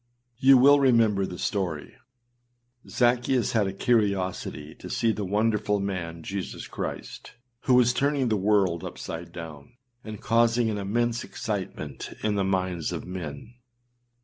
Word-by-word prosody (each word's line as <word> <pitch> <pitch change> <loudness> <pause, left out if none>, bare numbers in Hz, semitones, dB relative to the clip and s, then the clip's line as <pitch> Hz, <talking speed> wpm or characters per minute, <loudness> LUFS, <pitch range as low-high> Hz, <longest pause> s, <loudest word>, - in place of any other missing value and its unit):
You 135 0 +7
will 140 +3 +7
remember 115 -7 +3
the 90 - -7
story. 90 -7 -3 1.0
Zaccheus 120 +1 +2
had 105 -4 +2
a - - -2
curiosity 95 - -1
to - - -9
see 115 - +1
the 105 - -3
wonderful 105 +1 +1
man 85 -4 -4
Jesus 95 +1 -5
Christ, - - -6 0.3
who 130 - +4
was 125 -1 +5
turning 140 -1 +1
the 110 - +2
world 95 -4 +2
upside 85 +1 -7
down, 80 - -10 0.3
and 110 -2 -7
causing 115 0 +2
an 105 - -3
immense 120 +4 -1
excitement 95 -9 -5
in 105 - +1
the 100 -1 0
minds 95 -3 -1
of - - -5
men. 90 +3 -7
105 Hz, 140 wpm, -26 LUFS, 90-120 Hz, 1.0 s, You